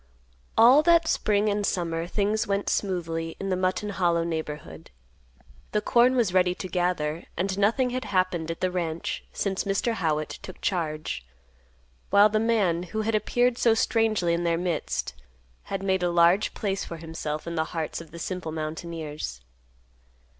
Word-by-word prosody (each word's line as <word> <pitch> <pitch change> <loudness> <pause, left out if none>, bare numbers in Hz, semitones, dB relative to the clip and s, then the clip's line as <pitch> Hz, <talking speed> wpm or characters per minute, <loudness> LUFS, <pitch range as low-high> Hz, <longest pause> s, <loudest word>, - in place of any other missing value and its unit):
All 245 +6 +8
that 335 0 +4
spring 210 -5 +2
and 205 0 0
summer 170 -3 -1
things 210 +3 0
went 200 0 0
smoothly 165 -4 -2
in 195 - -3
the 185 - +1
Mutton 185 +3 -1
Hollow 175 -4 +1
neighborhood. 160 -3 -5 0.8
The 210 - +2
corn 245 +4 +4
was 225 -8 +2
ready 180 -1 +3
to 185 - -6
gather, 175 -3 -1
and 190 +2 0
nothing 240 +5 +2
had 255 +1 -3
happened 185 -4 0
at 165 - -5
the 185 - +1
ranch 170 -2 -3
since 195 -2 -1
Mr. 200 +4 0
Howitt 155 -7 -1
took 185 - -10
charge, 155 - -2 0.9
while 205 +1 +6
the 215 +1 +1
man, 210 -7 +2
who 200 +5 -3
had 220 +1 -1
appeared 240 +3 +1
so 230 -2 +4
strangely 220 -6 +2
in 170 +1 0
their 170 -1 +1
midst, 150 - -2 0.5
had 195 0 -4
made 190 -1 +1
a 175 - +1
large 175 +4 +3
place 195 -2 -2
for 170 - -7
himself 160 -2 -5
in 170 - -4
the 160 -1 0
hearts 160 0 -4
of 165 - -12
the 170 - -10
simple 175 -1 -4
mountaineers. 155 - -5
180 Hz, 165 wpm, -26 LUFS, 165-210 Hz, 0.9 s, All